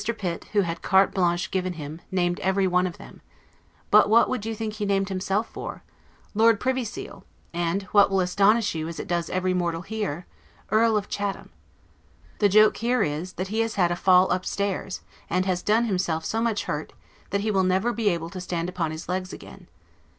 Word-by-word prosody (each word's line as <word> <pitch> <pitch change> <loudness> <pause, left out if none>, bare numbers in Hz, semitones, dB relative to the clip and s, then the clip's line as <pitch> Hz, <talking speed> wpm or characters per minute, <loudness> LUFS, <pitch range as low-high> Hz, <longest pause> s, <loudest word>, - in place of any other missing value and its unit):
Pitt, 175 -5 -4
who 205 - +4
had 170 -2 -3
carte 190 0 +3
blanche 175 -2 0
given 185 -1 -1
him, 155 0 -8
named 175 -1 0
everyone 185 -1 +2
of 175 - -8
them: - - -13 0.7
but - - +6
what 230 +2 +5
would 245 -4 -3
you 225 - -3
think 215 -1 -4
he 210 0 -5
named 195 0 +1
himself 195 +3 -1
for? - - -8 0.5
Lord 225 0 +4
Privy 260 0 0
Seal; 215 - -8 0.3
and 175 +3 -1
(what 205 -2 +6
will 195 -1 +1
astonish 200 +4 +3
you, 160 -1 -3
as 165 - -6
it - - -5
does 170 -3 -1
every 185 0 0
mortal 170 -2 -1
here) 200 -6 -4 0.5
Earl 220 0 +4
of 205 - -3
Chatham. 200 -1 -4 0.9
The 205 - +4
joke 215 +2 +5
here 240 -1 +1
is, 155 +5 -3
that 185 +1 -4
he 220 +2 -1
has 225 -1 0
had 175 -3 +2
A - - +1
FALL 185 +1 +4
UP 185 0 -2
STAIRS, 195 -1 -3 0.3
and 185 +1 +1
has 185 -2 0
done 220 +4 +2
himself 180 -6 -1
so 225 - -1
much 230 -2 0
hurt, - - -4 0.4
that 200 0 0
he 215 +1 0
will 195 -2 +2
never 190 +6 +1
be 225 -3 +1
able 170 -2 -3
to 185 -1 -6
stand 175 -1 -3
upon 180 -3 -2
his 155 +2 -7
leg's 185 +1 -3
again. - - -12
190 Hz, 200 wpm, -25 LUFS, 175-210 Hz, 0.9 s, but